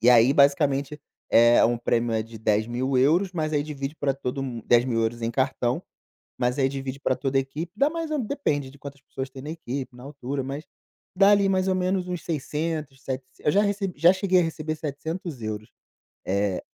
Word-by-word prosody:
E 120 Hz, -, +4 dB
aí 120 Hz, +1 st, +7 dB
basicamente, 140 Hz, 0 st, +3 dB, 0.3 s
é 120 Hz, +1 st, +6 dB
um 120 Hz, +1 st, +2 dB
prêmio 120 Hz, 0 st, 0 dB
é 110 Hz, -, +1 dB
de 115 Hz, 0 st, -11 dB
10.000€, 130 Hz, -, +2 dB
mas 155 Hz, -3 st, -2 dB
aí 145 Hz, -1 st, +2 dB
divide 140 Hz, -1 st, -5 dB
pra 140 Hz, -3 st, 0 dB
todo 135 Hz, 0 st, -3 dB
mun 120 Hz, -4 st, -5 dB
10.000€ 120 Hz, -1 st, +2 dB
em 115 Hz, -, -1 dB
cartão, 130 Hz, +3 st, 0 dB, 0.6 s
mas 125 Hz, +3 st, 0 dB
aí 135 Hz, -, +4 dB
divide 135 Hz, 0 st, -5 dB
pra 130 Hz, -, +1 dB
toda 135 Hz, 0 st, -1 dB
a -, -, +4 dB
equipe, 150 Hz, +6 st, -6 dB
dá 280 Hz, +5 st, +4 dB
mais 330 Hz, 0 st, -4 dB
ou 305 Hz, -, 0 dB
depende 210 Hz, -, -1 dB
de 140 Hz, -, -16 dB
quantas 140 Hz, 0 st, -9 dB
pessoas 135 Hz, 0 st, -6 dB
tem 130 Hz, -, -9 dB
na 145 Hz, -, -7 dB
equipe, 135 Hz, -5 st, -5 dB
na 125 Hz, -, -12 dB
altura, 140 Hz, -1 st, -4 dB
mas 140 Hz, +3 st, -5 dB, 0.5 s
dá 195 Hz, +2 st, +6 dB
ali 200 Hz, -1 st, +4 dB
mais 190 Hz, 0 st, +1 dB
ou 190 Hz, -, +3 dB
menos 185 Hz, 0 st, 0 dB
uns 180 Hz, -2 st, -4 dB
600, 150 Hz, -2 st, -3 dB
setecen 130 Hz, -1 st, -6 dB
eu 150 Hz, -, +6 dB
já 205 Hz, -, +5 dB
receb 200 Hz, -2 st, -1 dB
já 170 Hz, +1 st, +6 dB
cheguei 190 Hz, -1 st, +3 dB
a -, -, +2 dB
receber 155 Hz, -1 st, -3 dB
700€. 145 Hz, -, -5 dB, 0.6 s
Eh 100 Hz, -1 st, 0 dB
140 Hz, 195 wpm, -25 LUFS, 125-165 Hz, 0.6 s, aí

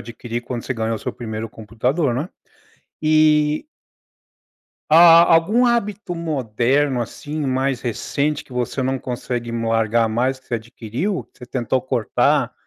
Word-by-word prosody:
adquirir, 120 Hz, +1 st, -6 dB
quando 120 Hz, -1 st, -5 dB
você 130 Hz, -, -3 dB
ganhou 115 Hz, 0 st, -1 dB
o -, -, -7 dB
seu -, -, -4 dB
primeiro 110 Hz, -1 st, -5 dB
computador, 120 Hz, +7 st, -1 dB
né. 150 Hz, +8 st, -3 dB, 0.7 s
E 155 Hz, -, +3 dB, 1.3 s
A 170 Hz, 0 st, +9 dB
algum 205 Hz, +10 st, +4 dB
hábito 210 Hz, -6 st, -1 dB
moderno, 135 Hz, -3 st, 0 dB
assim, 145 Hz, +5 st, -4 dB
mais 130 Hz, 0 st, 0 dB
recente, 140 Hz, +5 st, -2 dB
que 130 Hz, -, -17 dB
você 125 Hz, +2 st, -2 dB
não 130 Hz, +1 st, -1 dB
consegue 120 Hz, -1 st, -4 dB
largar 115 Hz, 0 st, +1 dB
mais, 130 Hz, +4 st, -1 dB
que -, -, -31 dB
você 120 Hz, -, -1 dB
adquiriu? 120 Hz, -, -3 dB
Que -, -, -27 dB
você 125 Hz, -, -10 dB
tentou 130 Hz, +1 st, -1 dB
cortar, 125 Hz, -4 st, +1 dB
130 Hz, 140 wpm, -21 LUFS, 115-150 Hz, 1.3 s, A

